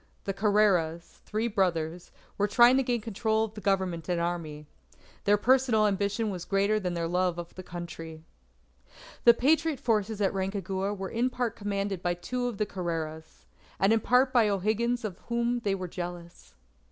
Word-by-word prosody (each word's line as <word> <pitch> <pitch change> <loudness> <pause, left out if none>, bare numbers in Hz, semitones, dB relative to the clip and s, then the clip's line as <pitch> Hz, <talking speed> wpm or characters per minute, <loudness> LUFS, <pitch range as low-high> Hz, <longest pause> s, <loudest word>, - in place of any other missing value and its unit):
The 195 - -2
Carreras 195 -5 +1
three 220 +2 -1
brothers 175 -5 -1 0.2
were 205 - +1
trying 240 +4 +6
to - - +4
gain 245 -3 -1
control 220 0 0
of 220 -1 -4
the 210 - -9
Government 185 -5 -1
and 175 -1 +1
Army. 165 -3 -3 0.6
Their 205 +1 +5
personal 245 -1 +3
ambition 205 +2 0
was 180 -3 -5
greater 200 +3 +1
than 180 -3 -3
their 170 -1 -1
love 180 0 0
of 175 0 -7
Country. 165 -2 -8 1.0
The 235 -1 +8
Patriot 305 +3 +2
forces 220 -4 0
at 200 -1 +1
Rancagua 195 +1 -2
were 190 0 -4
in 240 +3 +1
part 245 -3 -2
commanded 200 -2 -3
by 175 -1 0
two 245 +8 -3
of 235 -4 -4
the 210 - 0
Carreras, 165 -4 -5 0.3
and 195 +3 +4
in 225 - +3
part 255 +4 +3
by 230 -4 +4
O'Higgins 220 +4 0
of 190 -4 -5
whom 235 +1 0
they 200 -4 0
were 185 -1 -5
jealous. 175 -1 -8
200 Hz, 170 wpm, -28 LUFS, 175-225 Hz, 1.0 s, The